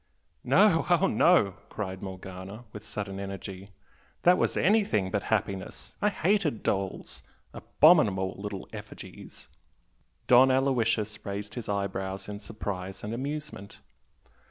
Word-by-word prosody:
"No, 200 -6 +4
oh 175 -2 +4
no!" 110 - +4
cried 95 -3 -5
Morgana, 95 +3 -8
with 105 - -8
sudden 100 -3 -5
energy 100 0 -7 0.5
"That 180 +1 +5
was - - +1
anything 185 - +2
but - - 0
happiness! 95 -1 -2
I 210 - +4
hated 185 - 0
dolls! 95 -1 -3 0.3
abominable 105 - +4
little 100 -1 -6
effigies!" - - -10 0.8
Don 125 +2 +7
Aloysius 115 -5 +1
raised 100 +1 -5
his 120 -3 -6
eyebrows 95 -1 -3
in 105 0 -6
surprise 100 -3 -6
and 105 +2 -4
amusement. 140 -4 -5
105 Hz, 115 wpm, -28 LUFS, 95-135 Hz, 0.8 s, Don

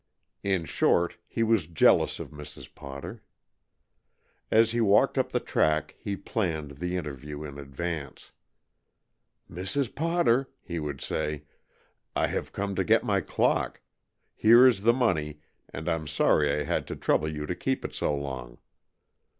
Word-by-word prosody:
In 95 -4 0
short, 85 +3 +1
he 115 - -1
was 110 -7 +2
jealous 85 -3 +3
of - - -7
Mrs. 75 0 -10
Potter. 70 0 -8 1.3
As 115 0 +4
he 120 0 0
walked 100 -2 +4
up - - 0
the - - +1
track 75 0 +1
he 100 -2 -3
planned 80 -10 -3
the 90 +2 -2
interview 75 -2 -6
in 70 -1 -8
advance. 70 +2 -6 1.2
"Mrs. 100 - -2
Potter," 160 -5 +2
he 85 -1 -4
would 75 -3 -5
say, 75 -1 -2 0.7
"I - - +2
have - - -3
come 100 0 -3
to - - +2
get - - +3
my - - +1
clock. - - 0 0.5
Here 120 +3 +7
is 120 -7 +4
the 115 +3 +5
money, 80 - 0 0.3
and 80 - -7
I'm 80 -3 -1
sorry 75 0 +3
I 75 +1 0
had - - -2
to - - -5
trouble 80 - +1
you 75 -1 -4
to 90 - -2
keep 130 +8 -2
it - - -5
so 75 - 0
long." 65 -4 -6
80 Hz, 150 wpm, -28 LUFS, 75-105 Hz, 1.3 s, Here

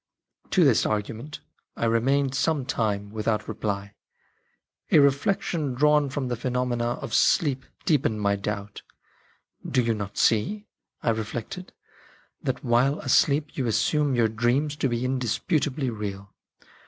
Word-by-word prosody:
To 185 - +4
this 135 -7 +4
argument 115 +8 -3 0.4
I - - 0
remained 130 +4 +2
some 145 0 0
time 105 -6 -1
without 110 0 -1
reply; 100 -1 -3 1.0
a - - +5
reflection 145 +1 +2
drawn 150 +1 +3
from 130 -1 -3
the 125 - -1
phenomena 120 -1 -1
of 115 - -6
sleep 135 -2 +2 0.2
deepened 130 -8 +1
my 100 -1 +2
doubt. 100 0 -5 0.5
" - - -15
Do 125 - +3
you 115 -1 +1
not 100 -2 -6
see," 205 - +2 0.4
I - - +3
reflected, 120 - -5 0.4
" - - -31
that - - -2
while 125 +5 +2
asleep 150 +2 +2
you 130 -3 -1
assume 145 +4 +1
your 115 -2 +3
dreams 120 +7 0
to 135 - 0
be 120 +1 -1
indisputably 130 - 0
real 100 -3 -6
125 Hz, 140 wpm, -25 LUFS, 110-145 Hz, 1.0 s, a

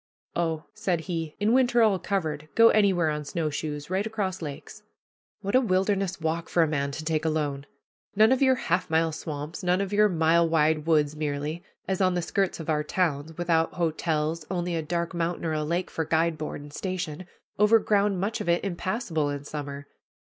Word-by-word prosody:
"Oh," 165 -2 -1
said 175 -3 -1
he, 165 -3 -4
"in 210 +3 +2
winter 245 -2 +4
all 205 -4 +3
covered, 155 -7 -2
go 230 0 +7
anywhere 190 -7 +3
on 150 0 -3
snowshoes, 150 0 -3
right 195 +3 0
across 200 -5 -3
lakes." 145 -3 -7 0.6
What 200 - -3
a 255 - +6
wilderness 195 -3 0
walk 165 +1 -2
for 170 - +3
a - - +2
man 140 -2 -1
to 155 +2 -6
take 155 -1 0
alone! 145 -3 -1 0.5
None 215 +3 +6
of 260 - +2
your 260 -1 +5
half 180 -5 -1
mile 160 0 +2
swamps, 155 +2 -6
none 180 0 +2
of 200 0 -2
your 210 +1 +5
mile 165 -1 +3
wide 155 -1 +2
woods 150 -2 +3
merely, 150 +2 -3 0.2
as 190 0 -1
on 185 -1 +3
the 175 - -1
skirts 195 +1 -1
of 160 - -7
our 150 -2 +1
towns, 155 -2 -1
without 165 -2 +1
hotels, 160 -1 -1
only 175 -1 -2
a 165 - 0
dark 170 +3 -2
mountain 170 0 -2
or 160 - 0
a 155 0 -1
lake 170 +4 -2
for 160 - -1
guide 160 +1 +1
board 155 -1 -5
and 145 0 -12
station, 185 -2 -4 0.3
over 210 +2 +6
ground 205 -3 +1
much 215 +4 -2
of 205 - -3
it 170 - +2
impassable 175 -4 -1
in 145 0 -4
summer! 145 -1 -6
165 Hz, 195 wpm, -26 LUFS, 155-190 Hz, 0.6 s, go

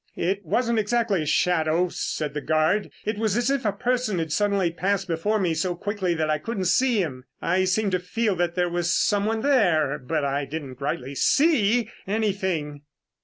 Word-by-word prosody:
"It 195 +3 -1
wasn't 230 +6 +1
exactly 215 -3 +1
a 155 - -4
shadow," 170 0 +2
said 150 -3 -3
the 150 - -3
guard. 155 +8 +1 0.2
"It 210 0 -2
was 220 -1 +1
as 240 +2 +1
if 275 -4 -1
a 210 - +3
person 240 -3 -1
had 165 -1 -2
passed 150 - 0
suddenly 200 -5 +1 0.3
before 180 +6 0
me 180 -5 +1
so 175 +3 -1
quickly 190 -1 -2
that 160 -1 0
I 155 -1 0
couldn't 195 +3 -3
see 215 +3 +3
him. 130 -5 -6
I 185 +2 +1
seemed 195 +2 +1
to 185 - +1
feel 205 +3 -1
that 175 0 0
there 180 -1 +1
was 175 0 -1
someone 210 +4 +1
there, 170 - +2
but 135 +2 -2
I 140 +1 -1
didn't 140 -3 -7
rightly 135 -1 -3
see 240 - +3 0.2
anything." 190 -8 -1
185 Hz, 185 wpm, -24 LUFS, 160-215 Hz, 0.3 s, a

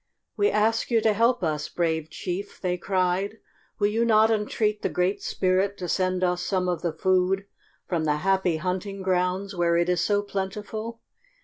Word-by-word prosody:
"We 410 +1 +3
ask 225 +2 +1
you 230 -2 +3
to 220 -1 +3
help 230 +1 +2
us, 150 -2 -1
brave 160 -2 -1
chief," 180 +4 -5
they 180 -1 -1
cried. 185 +3 0 0.4
"Will 205 - +1
you 225 +2 +1
not 220 -1 +4
entreat 210 0 0
the - - 0
Great 180 +3 0
Spirit 190 +2 0
to 180 - -5
send 185 +1 0
us 180 -1 +1
some 185 -2 0
of 175 -2 -1
the 170 - -1
food 185 +3 +1 0.4
from 165 -3 -1
the 150 -1 +2
Happy 190 0 +1
Hunting 185 +3 -3
Grounds 185 +1 0
where 170 -1 +2
it 170 +1 +1
is 180 -1 +2
so 205 -1 +1
plentiful? 210 +3 -5
190 Hz, 180 wpm, -25 LUFS, 180-210 Hz, 0.4 s, not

